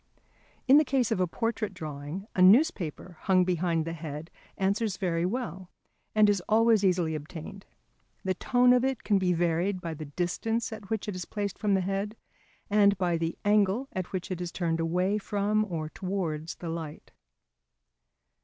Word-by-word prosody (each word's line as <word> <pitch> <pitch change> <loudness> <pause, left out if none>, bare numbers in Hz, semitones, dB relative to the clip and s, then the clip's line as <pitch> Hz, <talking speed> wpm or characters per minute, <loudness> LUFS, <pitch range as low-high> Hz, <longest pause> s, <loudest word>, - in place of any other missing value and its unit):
In 275 +3 +8
the - - +4
case 260 -4 0
of - - +1
a 185 - +2
portrait 225 +1 -2
drawing, 155 +3 -6
a 185 - +2
newspaper 185 - +3
hung 185 -2 +3
behind 170 -2 0
the 165 - -4
head 155 0 -7 0.3
answers 200 +1 0
very 175 -3 0
well 190 -5 -4 0.5
and 215 -1 +6
is 205 -3 +2
always 225 -1 +4
easily 180 -4 +2
obtained. 160 +6 -8 0.6
The 190 -1 0
tone 250 +4 +4
of 250 0 +3
it 265 -2 -1
can 205 -2 +2
be 185 -1 +1
varied 175 +3 +1
by 170 -2 -5
the 155 0 -7
distance 185 +10 -2
at 205 -3 -10
which 220 -2 -2
it 205 - -3
is 180 -2 -5
placed 205 -2 -4
from 205 -2 +2
the 190 - +2
head, 195 +3 -2 0.5
and 200 -1 +4
by 180 -2 +1
the 165 0 -2
angle 210 +5 +2
at 185 -1 -4
which 185 +1 -4
it 180 -1 -3
is 175 -1 -4
turned 165 -3 -1
away 180 +5 +1
from 205 +1 0
or 155 -3 -3
towards 170 -4 -3
the 170 - -6
light. 160 -2 -6
185 Hz, 175 wpm, -28 LUFS, 170-210 Hz, 0.6 s, In